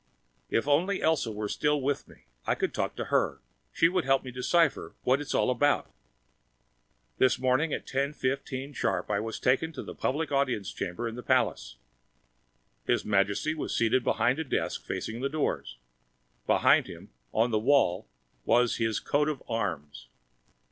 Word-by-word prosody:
If 115 - 0
only 175 +8 +2
Elsa 155 -8 +1
were 105 0 -3
still 150 +7 +1
with 140 +1 -2
me! - - -19 0.2
I - - +2
could - - -2
talk - - -2
to - - -4
her. - - +2 0.3
She 165 - +4
would 180 0 0
help 135 0 +2
me 130 - -7
decipher 145 +5 +1
what 130 +3 +2
it's 145 - -3
all - - +3
about. 145 +4 +1 1.3
This 130 - +4
morning, 130 +5 +1
at - - -3
10:15 135 0 -2
sharp, 120 -3 -1
I 100 - +1
was 110 +1 -4
taken 135 +6 +1
to 145 - -6
the - - -8
public 150 +4 -2
audience 130 -8 0
chamber 105 +7 -4
in 115 - -5
the 125 - -7
palace. - - 0 1.1
His - - +1
Majesty 100 +8 +1
was 155 - -3
seated 120 +2 +2
behind 130 +5 +1
a - - 0
desk 140 - -2
facing 115 +2 -4
the 135 - 0
doors. 135 - -2 0.7
Behind - - +4
him, - - -11 0.2
on 115 +2 +2
the 110 - +2
wall, 110 -6 +2 0.4
was 120 - +3
His 115 -2 0
Coat 145 +1 +1
of 150 -4 -4
Arms. 80 - -4
130 Hz, 165 wpm, -28 LUFS, 115-145 Hz, 1.3 s, She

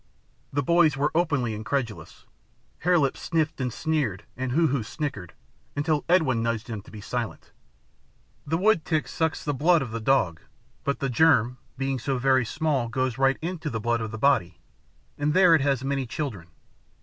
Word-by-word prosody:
The 140 +1 0
boys 165 -2 +4
were 145 +2 +1
openly 140 -9 +1
incredulous. 115 +1 -4 0.5
Hare 180 +1 +3
Lip 140 -4 +1
sniffed 160 -4 -1
and 125 -1 -1
sneered 140 - -1
and 130 0 -3
Hoo 165 +6 +3
Hoo 135 -1 0
snickered, 110 - -5 0.4
until 145 +1 0
Edwin 150 -10 +3
nudged 115 -1 -1
them 110 -4 -6
to - - -17
be 105 - -10
silent. 120 +1 -5 1.0
"The 160 +3 +1
woodtick 175 -5 +2
sucks 160 -1 -2
the 145 - 0
blood 160 +3 +3
of 120 - -7
the 115 - -3
dog, 110 -10 +2 0.4
but 140 - -2
the 135 - 0
germ, 125 -3 +3 0.2
being 135 0 -1
so 135 +2 -1
very 130 0 +3
small, 140 -1 0
goes 130 0 -1
right 135 0 +3
into 170 -2 -3
the 115 -4 -3
blood 120 +1 0
of 110 - -3
the 110 - -6
body, 135 -8 +2 0.6
and 150 +1 0
there 185 -2 +6
it 160 - +5
has 135 -2 +1
many 135 -1 -1
children. 115 - -5
135 Hz, 175 wpm, -26 LUFS, 120-155 Hz, 1.0 s, there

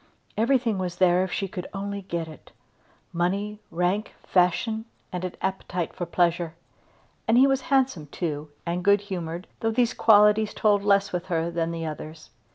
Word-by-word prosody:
Everything 230 -2 +2
was 180 -2 -3
there 180 0 +4
if 190 - -4
she 195 - -1
could 180 -1 -6
only 200 +1 -4
get 170 -3 -4
it; 155 -2 -13 0.6
money, 200 +5 -1
rank, 180 +5 -1
fashion, 220 +5 +1 0.3
and 180 0 -4
an 185 - -4
appetite 180 -2 -2
for 175 -2 -4
pleasure. 170 -1 +1 0.7
And 225 +1 +4
he 260 - +7
was 270 -1 +2
handsome 265 - +2
too, 150 -1 -4 0.2
and 175 +1 -2
good 200 +1 +5
humoured, 175 -3 -5
though 225 - 0
these 235 +1 +2
qualities 210 0 +5
told 205 -2 +3
less 200 -1 +3
with 180 +1 -3
her 170 -1 -1
than 170 -1 -1
the 165 -1 -4
others. 155 -3 -7
185 Hz, 165 wpm, -26 LUFS, 170-210 Hz, 0.7 s, he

